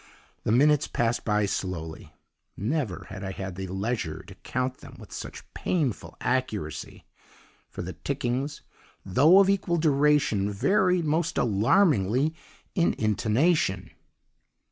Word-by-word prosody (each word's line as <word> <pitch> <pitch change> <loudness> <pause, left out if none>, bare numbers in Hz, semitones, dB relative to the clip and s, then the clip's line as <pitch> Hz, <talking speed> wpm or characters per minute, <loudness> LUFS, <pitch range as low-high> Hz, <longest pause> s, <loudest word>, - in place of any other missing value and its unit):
The - - +1
minutes 145 +4 +4
passed 120 0 0
by 105 -1 +1
slowly 85 -5 -4 0.5
never 115 - -2
had 100 -1 -7
I 95 - -3
had 95 -1 -5
the 95 +1 -5
leisure 95 -4 -3
to - - -12
count 125 +1 -3
them - - -13
with - - -13
such - - -7
painful 145 - -2
accuracy; 110 -11 -3 0.6
for - - -6
the - - -6
tickings, 130 +5 -3 0.4
though 145 - +5
of 195 -1 +6
equal 190 -3 +1
duration, 145 -9 +2
varied 180 - +2
most 160 +2 0
alarmingly 120 - +3 0.4
in 170 -2 +2
intonation. 110 - +1
125 Hz, 120 wpm, -27 LUFS, 100-155 Hz, 0.6 s, of